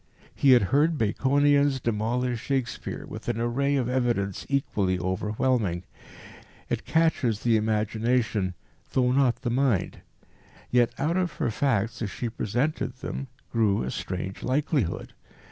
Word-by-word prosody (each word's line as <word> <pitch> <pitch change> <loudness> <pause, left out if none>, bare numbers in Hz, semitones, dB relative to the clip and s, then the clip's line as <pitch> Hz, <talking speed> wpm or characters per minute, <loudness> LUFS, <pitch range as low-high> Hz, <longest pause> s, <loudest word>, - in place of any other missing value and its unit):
He 135 -2 +5
had 120 - +5
heard 155 +3 +3
Baconians 140 +4 +3
demolish 120 +2 -1
Shakespeare 135 -3 -3
with - - -7
an 115 -1 -1
array 135 +5 +1
of 130 -4 0
evidence 120 -7 -1
equally 100 -9 0
overwhelming. 95 +1 0 0.9
It - - -2
catches 160 -9 +1
the 115 -2 +3
imagination 110 -2 0 0.4
though 125 -1 +3
not 130 -2 +2
the 120 - 0
mind. 125 -5 0 0.7
Yet 120 -1 +4
out 165 +5 0
of 180 -4 0
her - - -1
facts, 115 -3 0
as 110 - -1
she 120 +5 -4
presented 125 +9 -1
them, 135 0 -5 0.2
grew 105 - +2
a 65 - -3
strange 95 +1 -4
likelihood. 135 - -1
120 Hz, 130 wpm, -26 LUFS, 105-135 Hz, 0.9 s, He